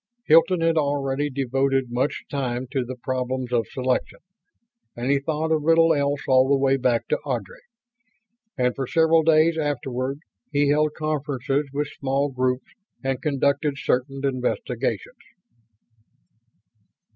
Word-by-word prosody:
Hilton 165 +3 +5
had 165 0 +2
already 145 -1 0
devoted 135 -1 0
much 130 +4 -1
time 130 -3 -3
to 135 -3 0
the 130 +1 -6
problems 130 0 -3
of 115 -2 +1
selection; 130 -1 -2 0.8
and 120 +3 -1
he 140 - +3
thought 155 +2 -2
of 155 -1 +2
little 165 +1 +4
else 145 -1 0
all 130 0 +4
the 140 - +4
way 135 0 +2
back 125 -3 0
to - - +1
Ardry. 120 -9 -4 1.0
And 125 -1 +1
for 135 -2 -3
several 165 0 +4
days 160 +1 +3
afterward 135 -2 -2 0.3
he 145 0 +2
held 150 +1 +2
conferences 145 -2 -2
with 145 +1 -2
small 140 +1 0
groups 130 0 -2 0.3
and 135 -1 -2
conducted 140 0 0
certain 135 +1 -1
investigations. 135 - -2
135 Hz, 135 wpm, -24 LUFS, 130-150 Hz, 1.0 s, Hilton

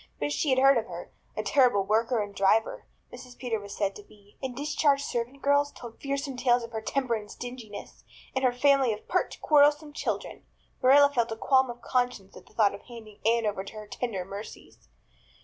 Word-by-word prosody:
But 145 0 -1
she 285 - 0
had 260 - +3
heard 270 -1 +6
of 225 - -6
her. - - -8 0.3
"A - - -1
terrible 245 -8 +3
worker 225 +3 +1
and 205 0 -9
driver," 200 +3 +1 0.3
Mrs. 245 0 -11
Peter 235 -4 -2
was 200 0 -9
said 200 -1 -1
to - - -9
be; 205 0 -22
and 260 -2 -4
discharged 290 -1 +1
servant 245 +3 -4
girls 285 0 +3
told 235 -2 -11
fearsome 275 -1 -3
tales 245 -1 +2
of 230 - -8
her 220 -1 -4
temper 255 +2 -1
and 210 -2 -4
stinginess, 235 -4 -9 0.3
and 265 - -1
her 255 - +4
family 270 0 +3
of 210 - -10
pert, - - -1
quarrelsome 295 0 +4
children. - - -4 0.4
Marilla 285 +2 +6
felt 235 -3 0
a - - -2
qualm 265 +1 +3
of 240 0 -8
conscience 245 -6 -1
at - - -14
the - - -21
thought 210 -3 +3
of 200 - -9
handing 220 -4 -12
Anne 230 0 +3
over 205 -2 -2
to 195 - -10
her 215 -1 -8
tender 205 -6 -4
mercies. 200 +3 -10
240 Hz, 205 wpm, -28 LUFS, 215-270 Hz, 0.4 s, heard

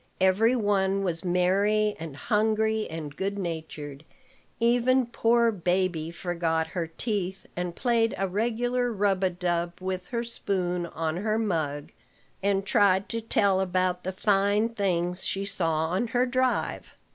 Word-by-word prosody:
Every 200 +6 +4
one 195 -3 +1
was 170 -3 -1
merry 200 +4 +2
and 160 -4 -7
hungry 220 +2 +1
and 155 -3 -6
good 200 +3 -2
natured. 160 -5 -5 0.6
Even 245 +2 +3
poor 235 0 +2
baby 180 -4 0
forgot 170 -2 -1
her 170 -2 -3
teeth, 190 +1 -3
and 175 -1 -3
played 230 -2 +1
a 195 - 0
regular 240 +5 0
rub 200 -3 +1
a 190 - +4
dub 175 -1 -1
with 185 0 -4
her 235 -1 -2
spoon 180 -6 -2
on 160 0 -3
her 215 +3 0
mug, 160 -9 -2 0.5
and 195 0 +1
tried 195 -1 +3
to 230 - -2
tell 200 -3 +2
about 185 -1 0
the 185 - -2
fine 205 +3 +2
things 180 -4 -1
she 195 +1 -1
saw 160 -5 0
on 190 +7 0
her 245 +2 +1
drive. 255 -1 -1
190 Hz, 145 wpm, -27 LUFS, 175-220 Hz, 0.6 s, Every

